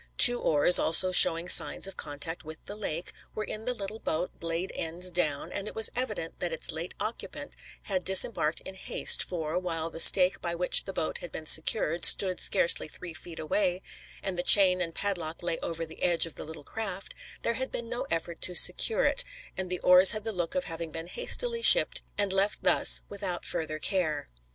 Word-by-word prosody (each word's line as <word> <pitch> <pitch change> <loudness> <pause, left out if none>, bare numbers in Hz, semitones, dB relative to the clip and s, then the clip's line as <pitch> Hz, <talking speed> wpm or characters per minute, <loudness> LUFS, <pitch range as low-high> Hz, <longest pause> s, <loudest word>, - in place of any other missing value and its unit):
Two 245 0 +6
oars, 150 +3 +6
also 185 +3 +5
showing 170 -1 +3
signs - - +5
of 195 - -6
contact 145 +3 -6
with 155 0 -12
the 205 - -9
lake, 175 -5 -7 0.2
were 215 - -5
in 215 +1 -9
the 250 - -3
little 210 +1 -9
boat, 170 -1 -5
blade 165 +2 -6
ends 175 +3 -3
down, 155 -5 -4
and 200 +1 -8
it - - -11
was 220 - +3
evident 255 +1 -6
that - - -5
its - - -3
late - - -9
occupant - - -8 0.3
had 190 -3 -4
disembarked 185 -4 0
in - - -12
haste, 190 - +1
for, 165 -1 -5
while 165 -2 -7
the 165 - -10
stake 185 +2 +4
by 170 -1 -5
which 180 +1 0
the 195 - -8
boat 160 - -6
had 175 - -12
been 160 - -10
secured, 165 +1 +4
stood 185 -2 +2
scarcely 170 - +2
three 170 +2 -11
feet 160 +1 -14
away, 180 +3 -3 0.4
and 185 -2 -5
the - - -1
chain 185 -1 +4
and 165 -2 -5
padlock 175 -5 -6
lay 170 -1 -4
over 165 0 -7
the 160 - -17
edge 175 -2 +1
of 165 - -11
the - - -11
little 160 -1 -11
craft, 195 +1 -8 0.3
there 235 - -2
had 260 +3 -7
been 235 - -8
no 240 +1 -7
effort 165 +1 -6
to 180 - +1
secure 475 - +6
it, - - +1 0.3
and 190 -1 -6
the 180 - -5
oars 180 +3 +6
had 215 -1 -7
the 225 0 -6
look 175 +5 -6
of 275 - -3
having 165 -4 -8
been 165 +1 -10
hastily 470 - -3
shipped - - +5 0.2
and 200 -2 -2
left 195 +2 -2
thus - - +2
without 195 -3 -7
further 155 -1 -6
care. 155 -4 -4
180 Hz, 205 wpm, -26 LUFS, 165-205 Hz, 0.4 s, Two